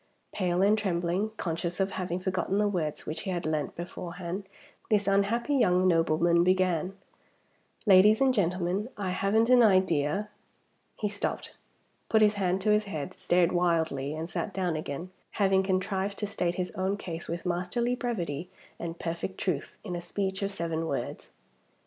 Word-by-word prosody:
Pale 180 -1 +1
and 205 +2 +5
trembling, 185 0 0
conscious 170 +1 -3
of 195 0 +1
having 180 -1 -3
forgotten 190 +1 -1
the 210 0 +3
words 165 -7 -2
which 155 - -4
he 195 - -5
had 175 -3 -2
learnt 155 -2 -1
beforehand, 175 +2 -6 0.4
this 205 -2 +2
unhappy 205 +7 +2
young 185 -8 +4
nobleman 170 0 +3
began: 185 0 +1 0.9
"Ladies 205 +2 +7
and 265 -1 +4
gentlemen, 185 +1 0
I 195 -3 -2
haven't 200 +5 +2
an 250 0 +6
idea 185 -2 +3 0.3
" - - -43
He 210 - +2
stopped, 205 0 -3 0.6
put 220 -1 +5
his 210 0 +5
hand 190 -2 0
to 210 - +2
his 210 0 +3
head, 180 -3 -5
stared 175 -1 +2
wildly, 160 -5 +1
and 160 +1 -4
sat 190 +4 -4
down 180 -4 0
again; 155 +4 -5 0.2
having 195 -2 +3
contrived 190 +1 -1
to 210 - -2
state 175 -3 -1
his 180 0 -2
own 190 +2 -1
case 170 -4 -6
with 170 +2 -4
masterly 180 +8 0
brevity 180 - -3 0.3
and 170 0 -5
perfect 170 +3 -4
truth, 165 -7 -2
in 180 -4 -4
a 175 - -4
speech 190 +2 -3
of 200 0 -1
seven 165 -3 -2
words. - - -4
185 Hz, 165 wpm, -29 LUFS, 170-200 Hz, 0.9 s, Ladies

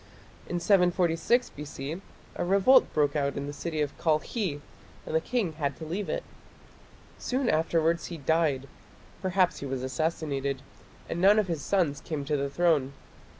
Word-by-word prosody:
In 175 - -1
746 180 +5 +3
B.C. 150 +3 -6 0.3
a - - -2
revolt 200 +8 +5
broke 145 -1 +1
out 140 -1 0
in 140 - -3
the 145 - -5
city 155 0 -3
of 145 -1 -2
Kalkhi 160 +1 0 0.5
and - - -6
the 160 - +3
king 215 -5 -1
had 140 -3 -2
to 160 - -7
leave 185 +6 -3
it. - - -2 1.0
Soon 260 0 -1
afterwards 165 -1 +1
he 170 - -6
died 145 -2 +1 0.5
perhaps 185 -1 +2
he 140 - -5
was 130 -1 -3
assassinated 140 -2 -2 0.4
and 170 - -3
none 200 +3 +6
of 215 - +3
his 165 -4 -2
sons 165 -5 +1
came 150 -3 -4
to 150 +1 0
the 140 0 -1
throne. 145 -3 +2
160 Hz, 160 wpm, -28 LUFS, 145-180 Hz, 1.0 s, none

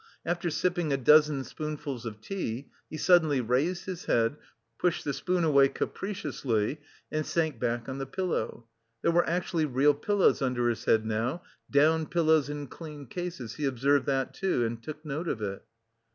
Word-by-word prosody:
After 175 0 -1
sipping 165 0 0
a 140 - +2
dozen 150 +1 +5
spoonfuls 145 -5 -5
of 105 -1 -8
tea, 135 - -4 0.2
he 155 - -6
suddenly 160 -6 +4
released 135 +10 0
his 185 -2 -6
head, 115 +3 +2 0.4
pushed 180 -2 0
the 145 - 0
spoon 180 +2 0
away 140 -4 +5
capriciously, 140 - -2 0.3
and 155 0 0
sank 160 -6 -1
back 120 -1 -1
on 135 0 -4
the 135 - -4
pillow. 150 -8 -2 0.4
There - - +4
were 170 0 +3
actually 170 -2 0
real 145 +1 +3
pillows 195 +4 +2
under 125 -2 +1
his 115 -2 -3
head 110 -1 +3
now, 115 +10 -1 0.3
down 155 +2 +3
pillows 160 -4 +3
in 145 0 -4
clean 150 0 -9
cases, 135 - -6
he 150 - -1
observed 135 +2 +2
that, 135 -2 0
too, 185 -11 0
and 115 0 -4
took 155 +5 -8
note 155 +4 -3
of 120 - -1
it. 100 -2 -4
145 Hz, 170 wpm, -29 LUFS, 125-165 Hz, 0.4 s, dozen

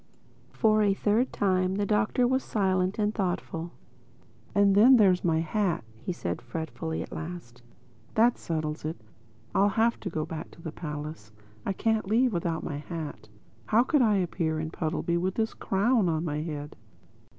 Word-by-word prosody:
For 215 -1 +3
a 200 -2 +3
third 220 +6 +1
time 185 -1 +1
the 205 0 0
Doctor 210 +4 +2
was 260 +1 +1
silent 190 -2 0
and 210 -1 +1
thoughtful. 175 -4 -2 0.9
"And 200 -1 +5
then 230 +7 +8
there's 190 -5 +4
my 160 -2 +2
hat," 180 - 0
he 115 - -5
said 90 - -4
fretfully 160 0 -4
at - - -12
last. 155 -8 -7 0.5
"That 235 +2 +4
settles 155 -2 -3
it: 155 +2 -4 0.5
I'll 200 +1 +4
have 225 +3 +2
to 195 - -4
go 155 -2 -2
back 160 - -6
to - - -15
the 160 - -4
palace. 150 -8 -7 0.4
I 195 - +1
can't 220 0 0
leave 235 +3 +3
without 170 -2 -1
my 145 - -4
hat. 150 -7 -7 0.4
How 230 +3 +4
could 290 +2 +2
I 215 -4 +4
appear 165 -4 0
in 155 0 -4
Puddleby 170 +1 -1
with 185 +2 -1
this 225 -1 0
crown 205 0 +2
on 160 +1 -1
my 150 -1 -2
head?" 150 -2 -5
185 Hz, 170 wpm, -28 LUFS, 160-210 Hz, 0.9 s, then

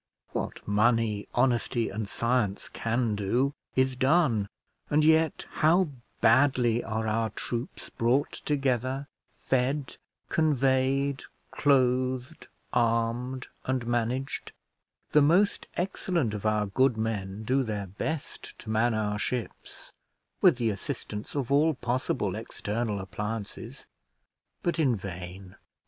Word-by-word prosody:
What - - -4
money, 105 0 +2
honesty, 120 -1 +2
and 105 +1 -3
science 115 -3 0
can 115 0 0
do, 120 +8 +1 0.2
is 130 0 +2
done; 130 - +3 0.4
and 150 +1 +3
yet 160 0 +3
how 170 +2 +3 0.3
badly 120 -1 +4
are 110 0 -2
our 110 +1 +1
troops 120 +4 -5
brought 120 +5 +1
together, 135 -1 -1 0.2
fed, 130 +2 -1 0.3
conveyed, 135 -2 +2 0.3
clothed, 130 +1 +1 0.3
armed, 120 +2 0 0.2
and 130 -2 -1
managed. 120 +3 -2 0.6
The 150 - +6
most 175 +8 +3
excellent 175 - 0
of 105 0 -2
our 105 -1 +2
good 120 +4 +2
men 105 -2 -3
do 130 +5 +2
their 105 -5 -3
best 135 - -5
to 110 - -7
man 110 +1 +2
our 105 -1 -1
ships, 125 0 -5 0.5
with 175 -9 +6
the 115 -3 +1
assistance 105 +2 -5
of 140 -3 -2
all 150 +2 +4
possible 125 +1 -1
external 105 -1 -3
appliances; 105 +2 -5 0.8
but 170 -2 0
in 135 -6 +3
vain. 95 -1 -8
120 Hz, 115 wpm, -28 LUFS, 110-135 Hz, 0.8 s, The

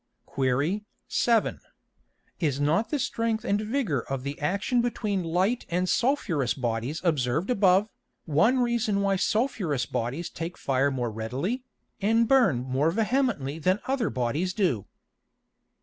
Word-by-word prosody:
Qu. 140 +9 0 0.3
7. 230 -3 +2 0.8
Is 145 -5 0
not 160 +10 +1
the 300 - 0
strength 230 -4 -1
and 205 +1 +1
vigor 215 - -1
of 135 +1 -5
the 140 +1 -5
action 200 - +1
between 215 -5 -1
Light 185 +8 +1
and 180 +2 0
sulphureous 180 - +1
Bodies 120 +3 -2
observed 155 - +1
above, 195 -2 +4 0.4
one 205 - +3
reason 235 -4 +1
why 200 -1 +2
sulphureous 190 - 0
Bodies 125 +7 -3
take 170 +2 -5
fire 135 +1 +1
more 125 -4 -2
readily, 130 - -3 0.4
and 225 +3 +3
burn 215 - +4
more 130 +4 +1
vehemently 215 - 0
than 185 +5 +2
other 260 -4 0
Bodies 145 +10 -1
do? 170 - 0
180 Hz, 135 wpm, -27 LUFS, 135-225 Hz, 0.8 s, above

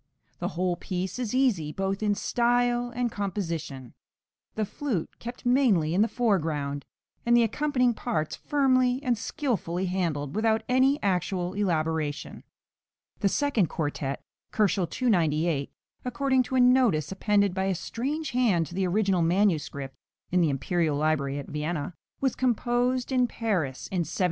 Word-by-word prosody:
The - - -1
whole 180 -1 0
piece 185 +4 -4
is 245 -1 -2
easy, 210 - +2
both 195 +3 -2
in 210 -1 +2
style 245 +1 +1
and 240 -1 -2
composition, 170 - -4 0.6
the 215 - 0
flute 215 - -4
kept 240 +1 -8
mainly 235 - +3
in 190 - +3
the 220 - +4
foreground, 155 - -1 0.4
and 240 0 +4
the 235 - +5
accompanying 250 +1 +1
parts 155 -10 -2
firmly 255 -3 +2
and 250 -3 +2
skilfully 215 - -2
handled, 165 -6 -2
without 220 0 +2
any 265 +3 +3
actual 180 -1 0
elaboration. 160 -6 -1 0.8
The 200 - +2
second 220 - +1
quartet 145 -4 -3 0.3
(298 190 -1 +2 0.4
K.), - - -41 0.3
according 260 +1 +1
to 260 - -2
a - - +4
notice 245 - +4
appended 200 0 +2
by 190 +1 -1
a 195 -1 0
strange 275 - -3
hand 225 -10 +2
to 160 - -11
the 190 0 0
original 195 -1 +2
manuscript 165 -6 0 0.4
(in 180 0 +3
the 165 - +3
imperial 150 +3 0
library 145 -2 0
at 140 - -5
Vienna), 150 +1 -3 0.3
was 265 -2 +1
composed 245 +1 0
in 250 -1 +3
Paris 185 - -2
in 185 - 0
1778. 165 -1 -3
195 Hz, 145 wpm, -27 LUFS, 165-245 Hz, 0.8 s, the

